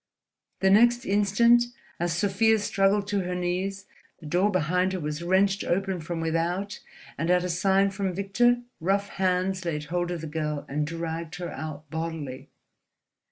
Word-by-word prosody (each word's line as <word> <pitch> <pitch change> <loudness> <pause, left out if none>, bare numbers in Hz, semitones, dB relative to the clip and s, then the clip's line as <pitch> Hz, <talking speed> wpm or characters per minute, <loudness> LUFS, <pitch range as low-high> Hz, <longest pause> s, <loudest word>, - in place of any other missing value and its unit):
The 190 0 +4
next 240 +4 +5
instant, 210 +4 +4 0.3
as 170 0 0
Sofia 205 +3 +3
struggled 200 0 +1
to 205 -1 +1
her 180 -1 -2
knees, 185 +2 -2 0.3
the 160 - -13
door 180 +7 +2
behind 180 0 +1
her 185 - -2
was 150 0 -4
wrenched 190 +3 +2
open 190 0 -1
from 165 +1 -4
without 170 +5 -1 0.4
and, 165 +2 -1
at 180 0 +4
a 180 - -2
sign 195 +3 +2
from 195 -1 -2
Victor, 240 +6 +2 0.2
rough 195 +4 0
hands 185 0 0
laid 155 -3 -2
hold 175 +3 -2
of 175 -2 -3
the - - -5
girl 150 -1 -3
and 150 +1 -2
dragged 165 0 -4
her 175 -1 -5
out 155 +1 -7
bodily. 160 -5 -5
180 Hz, 160 wpm, -26 LUFS, 165-195 Hz, 0.4 s, next